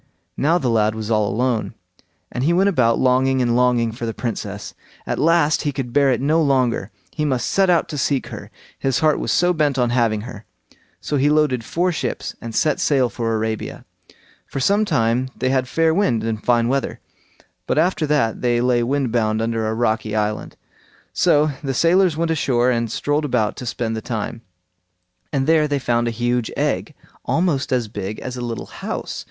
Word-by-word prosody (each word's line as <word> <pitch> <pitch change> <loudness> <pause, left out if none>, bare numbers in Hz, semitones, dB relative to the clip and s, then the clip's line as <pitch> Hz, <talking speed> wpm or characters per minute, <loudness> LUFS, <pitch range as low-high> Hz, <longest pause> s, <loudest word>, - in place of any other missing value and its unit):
Now 160 +5 +2
the 135 - -2
lad 110 -1 +2
was 110 0 -4
all 105 -2 +2
alone, 120 +2 -1 0.6
and 125 - -3
he 165 +5 +3
went 190 +3 +3
about 120 -10 +2
longing 130 +1 +2
and 120 -2 +1
longing 125 -2 +2
for 115 +1 -5
the 115 - -4
Princess; 105 -4 -5 0.3
at - - -2
last 165 -1 +3
he 145 - -1
could 130 -3 -5
bear 140 -1 +4
it 125 - +1
no 155 +5 +2
longer; 130 -8 +1 0.2
he 150 - -3
must 130 -5 0
set 195 -1 +2
out 170 -2 +3
to 150 - -4
seek 135 +1 0
her, - - -8 0.3
his 135 -3 0
heart 155 -1 +3
was - - -2
so 180 +1 +3
bent 150 -4 +1
on 120 -2 +1
having 115 -4 +1
her. 110 -2 -9 0.6
So 145 - -1
he 140 +2 +3
loaded 150 -5 +2
four 180 +9 0
ships 140 -8 -4
and 115 -1 -7
set 150 -2 +1
sail 135 -4 +2
for 115 -2 -2
Arabia. 110 0 -3 0.6
For - - -5
some 200 +10 +2
time 120 - +1
they 130 - -1
had 130 -1 +1
fair 165 +3 +2
wind 160 - +1
and 110 -1 -3
fine 120 -1 +2
weather, 135 +2 -1 0.7
but - - 0
after 170 -3 +1
that 140 -7 +1
they 120 -1 +2
lay 125 0 +2
wind 130 0 0
bound 110 -2 +1
under 115 -1 -1
a 110 - -1
rocky 110 -2 0
island. 105 0 -2 0.6
So 150 +1 +3
the 135 -2 -2
sailors 175 +1 +3
went 165 0 0
ashore 125 -5 +2
and 115 -2 -1
strolled 145 +1 0
about 120 -7 0
to 125 - -6
spend 115 -1 -2
the 110 - -4
time, 115 0 -4 0.9
and 135 -2 0
there 155 0 +3
they 145 -1 0
found 120 -3 0
a 115 -1 -3
huge 120 -1 0
egg, - - -1 0.3
almost 160 -5 0
as 125 -3 +1
big 105 -1 -5
as 130 -1 -6
a 125 - -5
little 120 -2 -4
house. - - -5
125 Hz, 195 wpm, -21 LUFS, 115-150 Hz, 0.9 s, bear